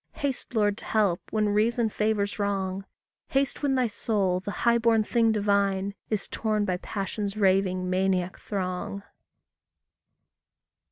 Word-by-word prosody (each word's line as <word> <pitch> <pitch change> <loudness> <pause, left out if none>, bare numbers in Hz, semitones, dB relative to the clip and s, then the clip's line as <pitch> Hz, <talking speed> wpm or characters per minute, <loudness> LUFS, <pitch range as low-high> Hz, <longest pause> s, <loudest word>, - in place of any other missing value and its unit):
Haste, 280 -5 -3
Lord, 205 -1 +2
to - - -11
help, 205 -6 +1
when 215 -1 +1
reason 225 +3 +2
favours 210 -1 0
wrong; 195 -1 -1 0.4
Haste 270 0 0
when 280 -2 +1
thy 255 -1 +2
soul, 205 -4 0
the 190 - -6
high 235 +3 +2
born 225 -1 +3
thing 230 +1 +2
divine, 200 -2 +1 0.2
Is 215 -3 -1
torn 215 -2 -1
by 180 -2 0
passion's 200 +2 -4
raving, 190 -2 +2
maniac 185 0 0
throng. 190 0 -4
205 Hz, 130 wpm, -27 LUFS, 190-220 Hz, 0.4 s, born